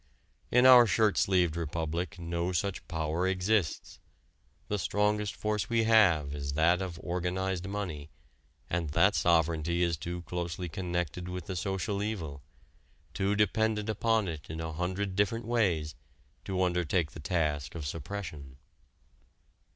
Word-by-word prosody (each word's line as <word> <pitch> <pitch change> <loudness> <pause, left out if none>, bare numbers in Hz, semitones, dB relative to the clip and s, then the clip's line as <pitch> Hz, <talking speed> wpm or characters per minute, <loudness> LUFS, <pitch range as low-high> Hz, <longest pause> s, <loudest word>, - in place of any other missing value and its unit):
In 125 +1 +4
our 125 -2 +9
shirt 110 -2 +3
sleeved 90 -4 +2
republic 85 +3 -3
no 85 +1 -2
such 100 +3 -2
power 80 +2 -1
exists. 95 -1 0 0.7
The 105 - -1
strongest 105 +2 0
force 105 -1 -2
we 115 -1 +2
have 95 -11 +4
is 70 -1 -4
that 85 +4 +3
of 90 -3 -5
organized 90 +1 -2
money, 90 -8 -4 0.6
and 85 -2 -2
that 100 +5 +5
sovereignty 85 0 +2
is 85 -2 +1
too 85 +3 -5
closely 85 0 -4
connected 90 0 -3
with 90 -1 -5
the 95 - -5
social 95 +2 -2
evil, 85 -10 -4 0.7
too 100 +2 0
dependent 105 +1 +1
upon 110 -1 +1
it 80 -3 -6
in 80 +1 -5
a 80 -1 -4
hundred 95 +4 -2
different 105 +4 0
ways, 95 -10 +1 0.5
to 95 -1 0
undertake 90 -2 0
the - - -10
task 75 -4 -1
of 80 -3 -5
suppression. 75 -3 -6
90 Hz, 135 wpm, -30 LUFS, 80-100 Hz, 0.7 s, our